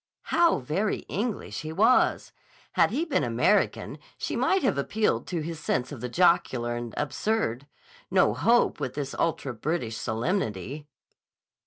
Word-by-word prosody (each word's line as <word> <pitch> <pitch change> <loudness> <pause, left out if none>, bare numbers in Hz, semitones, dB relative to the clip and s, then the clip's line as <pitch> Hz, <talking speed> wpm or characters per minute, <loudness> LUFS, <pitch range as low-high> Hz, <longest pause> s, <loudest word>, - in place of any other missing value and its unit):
How 340 0 +4
very 175 +11 -1
English 220 +1 -3
he 155 0 -6
was! 215 +9 +3 0.4
Had - - +3
he 300 +8 -1
been 315 - 0
American, 120 - +1 0.2
she - - -3
might 385 -4 +2
have 255 - +2
appealed 210 +9 0
to 175 -3 -2
his 165 0 -5
sense 130 -4 -1
of 135 -6 -7
the 125 - -3
jocular 125 -7 +2
and 120 -1 -5
absurd. 145 - -1 0.4
No - - +4
hope 240 +1 +3
with 125 - -4
this 140 -2 -4
ultra 145 -5 -1
British 120 -2 -2
solemnity. 120 - -2
155 Hz, 145 wpm, -27 LUFS, -, 0.4 s, How